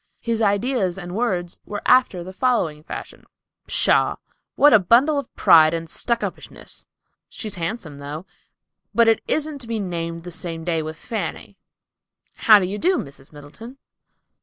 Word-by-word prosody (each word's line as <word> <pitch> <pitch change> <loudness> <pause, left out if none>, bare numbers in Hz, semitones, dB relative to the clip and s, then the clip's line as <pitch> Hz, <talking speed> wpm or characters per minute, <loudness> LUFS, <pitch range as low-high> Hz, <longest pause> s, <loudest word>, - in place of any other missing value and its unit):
His 230 -1 -2
ideas 205 -2 +1
and 175 -2 -7
words 185 -6 -2
were 205 -1 -6
after 250 -9 +3
the 185 +2 -9
following 190 -11 0
fashion: - - -9 0.4
"Pshaw! - - +2 0.4
What 295 0 +6
a 215 - +8
bundle 255 - +4
of 275 - -8
pride 160 0 +6
and 165 0 -5
stuck 235 +8 -2
up - - -3
ishness! - - -11 0.4
She's 215 -3 -6
handsome, 165 -5 -5
though, 145 +5 -7 0.7
but 235 -1 +5
it 225 - +3
isn't 305 -1 -1
to 240 - -8
be 225 -1 -2
named 170 -3 -4
the 175 - -8
same 165 -2 -6
day 165 -1 0
with 155 0 -6
Fanny,"—"How 220 0 -1
do 195 - 0
you 200 +3 -4
do, 365 +2 +2
Miss 140 -1 -8
Middleton?" 155 - -12
190 Hz, 160 wpm, -22 LUFS, 165-235 Hz, 0.7 s, a